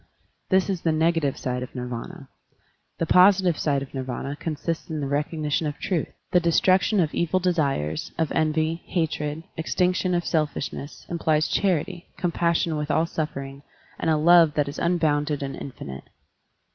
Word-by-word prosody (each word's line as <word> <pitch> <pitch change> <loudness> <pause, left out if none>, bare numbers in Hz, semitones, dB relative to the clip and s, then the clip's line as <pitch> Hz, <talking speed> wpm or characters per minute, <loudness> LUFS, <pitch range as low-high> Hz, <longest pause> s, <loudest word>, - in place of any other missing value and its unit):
This 190 -1 +3
is 190 -4 -2
the 165 - +1
negative 160 -3 +1
side 125 -1 -3
of 125 - -7
Nirv&na. 125 +6 -6 0.7
The 165 - 0
positive 185 0 +5
side 140 -2 +1
of 135 - -12
Nirvana 135 +1 -4
consists 160 +2 -4
in 155 -1 -3
the 145 - -2
recognition 150 +2 -1
of 145 - -4
truth. 175 -6 -1 0.2
The 180 - +5
destruction 185 +4 +3
of 160 -4 +1
evil 170 +2 +1
desires, 140 - 0
of 160 -2 0
envy, 160 +1 0
hatred, 155 -2 -2
extinction 180 +2 +1
of 175 - -1
selfish 155 -3 -1
ness 145 - -8
implies 160 -2 +1
charity, 180 -2 0
compassion 170 -2 0
with 150 0 -3
all 160 - +2
suffer 155 -4 -3
ing, 135 0 -10 0.4
and 165 - 0
a 155 - +3
love 165 -1 +6
that 145 -1 +1
is 140 - -6
unbounded 150 -4 +1
and 135 0 -4
infinite. 70 - -8
160 Hz, 160 wpm, -25 LUFS, 145-170 Hz, 0.7 s, love